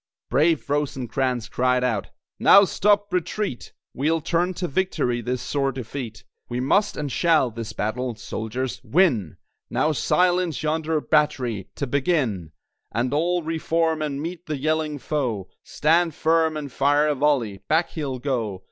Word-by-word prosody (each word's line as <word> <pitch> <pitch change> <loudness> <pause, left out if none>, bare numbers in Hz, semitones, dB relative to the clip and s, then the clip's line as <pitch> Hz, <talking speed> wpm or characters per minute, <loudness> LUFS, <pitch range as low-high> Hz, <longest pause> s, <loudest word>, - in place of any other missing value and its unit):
Brave 155 +5 +2
Rosecrans 130 -4 -1
cried 125 +1 +1
out 115 -5 0 0.3
"Now 200 - +8
stop 205 +1 +2
retreat! 180 - -2 0.2
We'll 155 +5 +1
turn 175 +4 0
to 180 - -2
victory 135 -8 0
this 125 +1 -3
sore 135 -1 0
defeat! 125 -2 -6 0.3
We 120 0 -2
must 200 +11 +2
and 145 -2 -3
shall 160 -7 +3
this 115 0 -6
battle 120 +3 -2
Soldiers! 120 +3 -4
win! 135 - +2 0.3
Now 155 - +1
silence 175 +1 +1
yonder 160 0 0
batt'ry, 125 -11 +1
to 140 - -2
begin! 130 - 0 0.4
And 125 +4 -1
all 175 +3 +1
re 160 +1 -2
form 160 -1 +1
and 145 -2 -2
meet 170 +3 -6
the 155 -1 -2
yelling 155 +1 -1
foe! 125 -10 -2
Stand 165 +1 +2
firm 160 -1 +2
and 145 -3 -6
fire 145 +3 +3
a 150 - +2
volley! 130 -8 +1
Back 160 +2 +2
he'll 140 -5 -3
go. 120 -7 -2
145 Hz, 145 wpm, -24 LUFS, 125-160 Hz, 0.4 s, Now